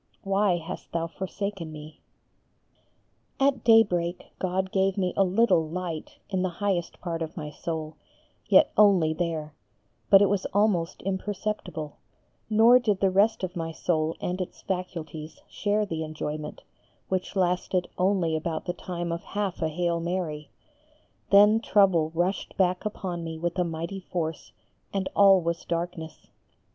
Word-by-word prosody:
why 195 -2 +2
hast 165 -1 -8
Thou 165 0 -1
forsaken 190 0 -5
me." 155 0 -11 1.4
At 270 -2 +2
daybreak 180 -6 +3
God 190 +1 -1
gave 195 0 +1
me 185 -2 0
a 195 - +4
little 185 -4 +3
light 170 -2 -5
in 190 -1 0
the 185 - 0
highest 180 -1 -2
part 170 -2 -3
of 160 +2 -5
my 150 -2 -5
soul, 155 0 -5 0.5
yet - - +6
only 190 -7 +5
there; 160 -2 -3 0.6
but 195 - +9
it 200 - +5
was 195 0 0
almost 200 -5 +1
imperceptible; 190 -5 -4 0.5
nor 225 +3 +6
did 210 -6 0
the 195 -1 +3
rest 205 +3 +3
of 185 0 -3
my 165 -1 -3
soul 160 -1 -1
and 180 +1 -2
its 180 - -7
faculties 165 -4 -5
share 210 +1 0
the 165 -5 -4
enjoyment, 155 -1 -5 0.5
which 185 +1 -2
lasted 180 0 +1
only 180 -4 +1
about 160 +1 -3
the 175 - -2
time 175 -2 -5
of 170 0 -3
half 205 -3 -3
a 160 - +1
Hail 170 +1 -1
Mary, 165 -4 -3 0.8
then, 210 +2 +7
trouble 190 -8 +3
rushed 180 +4 -1
back 185 +1 +1
upon 185 -5 -4
me 165 -1 -5
with 170 +1 -2
a - - +4
mighty 170 +3 -4
force, 165 -3 -4 0.4
and 195 -1 -2
all 195 -2 +7
was 170 0 -2
darkness. 170 -1 -4
180 Hz, 150 wpm, -27 LUFS, 165-195 Hz, 1.4 s, but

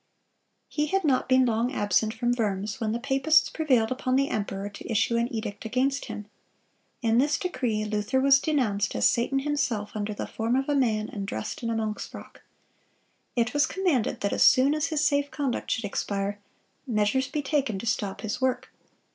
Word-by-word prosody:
(238) 300 0 -1
He - - 0
had 390 - +1
not 265 -3 +1
been 260 0 +5
long 235 +1 +1
absent 205 -2 +1
from 240 +2 -1
Worms, 210 -3 -2
when 220 -1 0
the 230 - -1
papists 270 +5 +3
prevailed 255 -8 +2
upon 255 0 0
the 275 +1 +2
emperor 200 -2 -3
to 205 +3 -8
issue 225 +2 +2
an 235 +1 0
edict 215 -3 -5
against 260 +5 0
him. 210 - -7 0.8
In 230 +1 +3
this 290 +3 +2
decree 240 - -2
Luther 210 +5 0
was 275 +1 +6
denounced 245 -9 0
as - - +4
"Satan 240 +3 +1
himself 270 -7 -1
under 210 0 -3
the - - -4
form 230 +2 -1
of 270 +1 0
a 290 - +1
man 220 -6 +1
and 200 -2 -6
dressed 110 - -5
in 230 - -2
a 230 - -1
monk's 215 -1 -3
frock."(239) - - -12 0.9
It 240 0 +1
was 290 0 +3
commanded 350 - 0
that 200 - 0
as - - -1
soon 265 +3 +6
as 305 +1 0
his 310 -2 0
safe 285 -1 +2
conduct 280 -5 -3
should 225 - -1
expire, 200 0 -2 0.5
measures 230 +3 +1
be 295 +1 -3
taken 275 -7 0
to 190 - -6
stop 205 -3 -2
his 220 +4 -4
work. 255 0 -1
240 Hz, 195 wpm, -27 LUFS, 215-275 Hz, 0.9 s, was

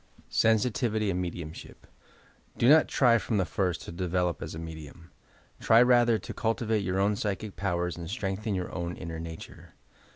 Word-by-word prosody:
SENSITIVITT 110 -1 +1
AND 90 0 -1
MEDIUMSHtP 85 -3 -7 0.8
Do 120 - +3
not 155 +3 +7
try 120 -3 +4
from 105 +2 -2
the 95 - +2
first 90 0 -2
to - - -8
develop 90 0 -1
as - - -6
a - - -6
medium. 80 +1 -9 0.5
Try 115 - +5
rather 120 -2 +4
to - - -8
cultivate 110 -1 0
your 95 0 -1
own 100 +2 +2
psychic 100 0 -3
powers 90 -2 -2
and 85 -1 -7
strengthen 100 0 -3
your 90 -1 -4
own 85 -1 -4
inner 80 -1 -6
nature. 80 0 -10
95 Hz, 165 wpm, -28 LUFS, 85-110 Hz, 0.8 s, not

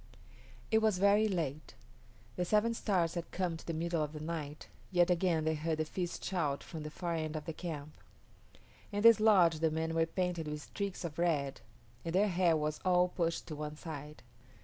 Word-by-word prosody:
It 220 - +5
was 215 -4 +3
very 200 +3 +4
late. 160 -7 -3 0.6
The 180 - 0
Seven 215 +5 +2
Stars 180 -7 +1
had 170 -1 -4
come 180 -3 -1
to 160 - -11
the - - -1
middle 165 0 -1
of 150 0 -2
the 155 - -6
night, 155 -2 -5 0.2
yet 175 -1 +3
again 170 -2 +2
they 160 - +2
heard 160 +1 -1
the 155 - 0
feast 175 +2 -4
shout 150 -7 -1
from 160 - -7
the 150 - -5
far 170 +2 -3
end 155 -1 -2
of 155 - -4
the 165 - -4
camp. 155 -3 -6 1.0
In 205 0 -1
this 230 -1 +8
lodge 185 -7 +5
the 160 0 +3
men 160 +1 -2
were 165 0 +2
painted 175 -2 -2
with 150 0 -4
streaks 200 -3 -4
of 160 -1 -6
red, 145 -6 0 0.4
and 165 +1 -3
their 205 +2 +4
hair 175 -3 +3
was 150 0 -2
all 180 -1 +4
pushed 170 -2 -1
to 155 - -4
one 150 0 -5
side. 150 -2 -8
165 Hz, 200 wpm, -33 LUFS, 155-180 Hz, 1.0 s, this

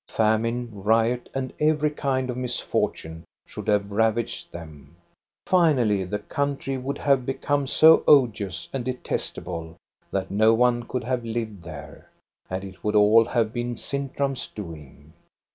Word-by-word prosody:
Famine, 115 +2 +1
riot, 115 +4 +1
and 130 -1 -4
every 150 0 +2
kind 130 -3 -1
of - - -6
mis 125 -1 -3
fortune 80 +1 -3 0.2
should - - -9
have 100 -1 +1
ravaged 110 +2 0
them. 80 -3 -11 0.5
Finally, 125 - +3
the 105 +3 -2
country 140 +5 -3
would 135 +2 -4
have 140 -3 +2
become 140 +2 -1
so 160 +4 +6
odious 105 - +3
and 135 -2 -2
detestable 90 -9 -4 0.3
that 95 -1 -3
no 110 +3 +4
one 120 0 +3
could 125 - -3
have 125 0 -2
lived 110 -4 -4
there, 80 -4 -11 0.4
and 95 +1 -3
it 95 -3 -11
would 105 0 0
all 105 +2 +6
have 115 -2 0
been 120 0 -3
Sintram*s 140 +1 -3
doing. 75 -6 -10
115 Hz, 145 wpm, -25 LUFS, 100-130 Hz, 0.5 s, so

